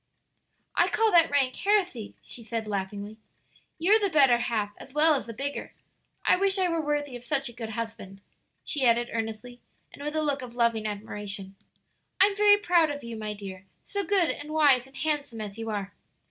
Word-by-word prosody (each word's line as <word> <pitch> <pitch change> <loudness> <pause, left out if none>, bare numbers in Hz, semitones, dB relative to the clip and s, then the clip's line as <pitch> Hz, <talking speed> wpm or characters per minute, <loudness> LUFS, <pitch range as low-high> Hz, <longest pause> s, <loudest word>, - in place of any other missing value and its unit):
"I - - +4
call 445 -1 +2
that 335 -2 +6
rank 270 -3 +2
heresy," 365 - 0
she 235 - -8
said 225 -1 -4
laughing, 205 +1 -4 0.6
"you're 395 +7 +4
the 405 -2 +1
better 270 -7 +5
half 215 -4 -1
as 270 - -13
well 310 +1 +6
as 275 - -2
the - - -5
bigger. 280 +5 -4 0.5
I - - +5
wish 390 +1 +2
I 375 -1 +2
were 335 -1 0
worthy 290 -3 -2
of 245 - -9
such 275 0 0
a - - -11
good 225 -1 -6
husband," 225 -4 -6 0.4
she 290 -4 -1
added 240 0 +3
earnestly 225 +2 -5 0.3
and - - -12
with 300 +1 -3
a 310 - +1
look 290 -2 -1
of 240 -2 -9
loving 230 -2 +1
admiration. 200 -2 -6 0.6
"I'm 395 +1 +5
very 410 0 +6
proud 345 -5 +3
of 290 0 -5
you, 235 -1 -6
my 215 -1 -4
dear 190 -2 -9 0.2
so 405 0 -2
good 370 -2 +2
and 295 +1 -7
wise 285 -5 +4
and 270 - -15
handsome 290 -7 -2
as 210 0 -6
you 225 0 -4
are!" 200 -2 -4
255 Hz, 195 wpm, -27 LUFS, 220-315 Hz, 0.6 s, that